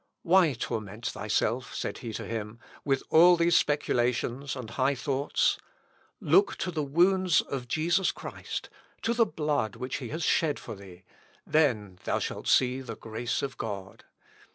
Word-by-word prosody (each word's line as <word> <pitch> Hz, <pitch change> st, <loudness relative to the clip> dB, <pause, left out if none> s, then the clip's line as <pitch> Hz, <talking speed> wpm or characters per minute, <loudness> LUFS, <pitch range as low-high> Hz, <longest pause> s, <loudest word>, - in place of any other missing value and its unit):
"Why 175 Hz, -4 st, +4 dB
torment 110 Hz, -1 st, -5 dB
thyself," 115 Hz, +4 st, -1 dB
said -, -, -4 dB
he 115 Hz, -, -6 dB
to -, -, -5 dB
him, 110 Hz, -1 st, -5 dB, 0.3 s
"with 135 Hz, -2 st, 0 dB
all 175 Hz, +2 st, +7 dB
these 170 Hz, 0 st, +3 dB
speculations 130 Hz, -2 st, 0 dB
and 125 Hz, -4 st, -7 dB
high 135 Hz, +3 st, +1 dB
thoughts? 135 Hz, +2 st, 0 dB, 0.6 s
Look 395 Hz, +1 st, +3 dB
to 180 Hz, -, -2 dB
the 160 Hz, -3 st, -2 dB
wounds 175 Hz, +4 st, +3 dB
of 130 Hz, -3 st, -5 dB
Jesus 170 Hz, +8 st, +1 dB
Christ, -, -, -7 dB, 0.3 s
to 230 Hz, -, +1 dB
the 235 Hz, -2 st, +3 dB
blood 150 Hz, -, -1 dB
which 130 Hz, +1 st, -4 dB
he 125 Hz, -4 st, -6 dB
has 160 Hz, +2 st, -4 dB
shed 155 Hz, -1 st, +2 dB
for -, -, -8 dB
thee; 95 Hz, -3 st, -13 dB, 0.4 s
then 110 Hz, -12 st, +1 dB
thou -, -, +1 dB
shalt -, -, -4 dB
see 130 Hz, +1 st, +3 dB
the 115 Hz, -4 st, -7 dB
grace 115 Hz, +3 st, -3 dB
of 130 Hz, -3 st, -5 dB
God. 100 Hz, -3 st, -6 dB
135 Hz, 155 wpm, -28 LUFS, 115-160 Hz, 0.6 s, all